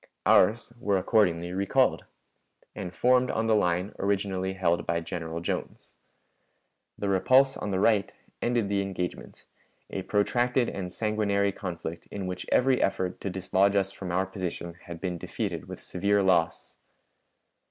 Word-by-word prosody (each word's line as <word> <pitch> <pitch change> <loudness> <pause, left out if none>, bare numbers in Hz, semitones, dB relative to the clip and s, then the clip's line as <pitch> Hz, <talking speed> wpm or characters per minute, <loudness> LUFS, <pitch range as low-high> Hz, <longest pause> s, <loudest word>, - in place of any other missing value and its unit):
Ours 115 +5 +4
were 100 -5 +1
accordingly 90 -4 +2
recalled, 95 +1 +2 0.7
and 90 -2 -6
formed 125 +6 +3
on 110 - 0
the 110 -1 +3
line 90 -1 +1
originally 95 -1 -1
held 85 -3 +1
by 85 0 +1
General 80 -1 -5
Jones. 85 - -5 1.0
The 100 - -3
repulse 130 +8 +4
on 105 - -4
the 95 -1 0
right 105 -1 +3 0.3
ended 120 -3 +1
the 100 0 +1
engagement, 95 -2 -5 0.5
a 95 - -3
protracted 120 +5 +1
and 90 -2 -5
sanguinary 100 -1 +1
conflict 85 -3 -6
in 100 -2 -5
which 90 0 -5
every 130 0 +3
effort 95 -1 -1
to 100 - -2
dislodge 95 +2 +1
us 95 -1 +1
from 95 -2 -6
our 95 +2 +1
position 90 -3 -5
had 85 -1 -8
been 90 -2 -3
defeated - - -4
with - - -9
severe 100 +2 +1
loss. 85 -3 +1
95 Hz, 145 wpm, -28 LUFS, 90-105 Hz, 1.0 s, Ours